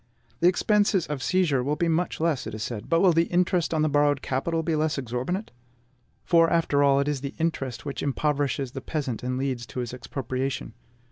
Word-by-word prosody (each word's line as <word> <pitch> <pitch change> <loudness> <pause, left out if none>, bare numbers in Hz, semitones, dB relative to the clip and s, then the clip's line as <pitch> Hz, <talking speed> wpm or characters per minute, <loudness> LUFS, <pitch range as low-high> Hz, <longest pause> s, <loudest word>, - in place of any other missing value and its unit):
The 170 - +4
expenses 200 -1 +3
of 150 -3 -4
seizure 165 -4 +2
will 145 +3 0
be 170 - 0
much 165 +1 0
less, 160 -5 0
it 110 - -5
is 110 - -4
said; 110 -3 -5
but 165 0 +3
will 185 -3 +5
the 165 +1 +3
interest 175 -1 +1
on 155 -2 +1
the - - +3
borrowed 145 -1 +2
capital 160 +5 -1
be 160 0 0
less 155 0 0
exorbitant? 130 - -3 0.7
For, 165 -1 +5
after 160 -4 +2
all, 140 -1 +4
it 140 - 0
is 145 -3 -1 0.2
interest 140 -7 -2
which 140 - -4
impoverishes 140 -2 -1
the 135 - -6
peasant 135 -5 -3
and 125 +1 -2
leads 130 -3 -2
to 110 - -6
his 120 -1 -4
expropriation. 130 0 -4
145 Hz, 200 wpm, -26 LUFS, 130-165 Hz, 0.7 s, will